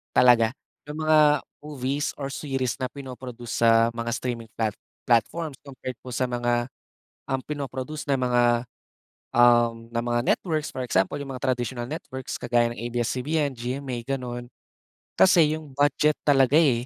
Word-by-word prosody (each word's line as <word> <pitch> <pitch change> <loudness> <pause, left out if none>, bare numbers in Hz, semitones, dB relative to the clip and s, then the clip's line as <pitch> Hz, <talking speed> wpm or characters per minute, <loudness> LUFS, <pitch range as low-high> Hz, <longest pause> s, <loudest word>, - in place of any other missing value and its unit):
talaga. 115 -3 +6 0.4
'Yong 150 +1 -6
mga 155 0 +6 0.4
movies 140 -1 -2
or 135 - -3
series 135 -4 -2
na 130 - 0
pinoproduce 125 -4 -7
sa 115 0 +6
mga 115 0 -3
streaming 120 -3 -4
plat 110 -2 +1 0.3
platforms 135 +6 +1
compared 130 -2 -7
po 125 - -6
sa 130 - +1
mga, 120 0 0 0.6
um, 135 - 0
pino-produce 145 0 -5
na 140 - +4
mga, 120 -1 +3 0.7
um, 120 -1 +4
ng 115 0 -2
mga 120 0 +1
networks. 155 -4 -3
For 130 - -3
example, 95 0 +1
'yong 140 - -6
mga 125 - -6
traditional 120 0 -3
networks, 130 -4 -6
kagaya 120 -1 +2
ng - - -9
ABS-CBN, 130 +5 0
GMA, 125 0 -4
gano'n. 125 -2 -4 0.7
Kasi 165 -5 +6
'yong 150 -3 -12
budget 145 +2 +3
talaga, 135 -1 +4
eh. 125 -7 +3
125 Hz, 145 wpm, -25 LUFS, 120-140 Hz, 0.7 s, talaga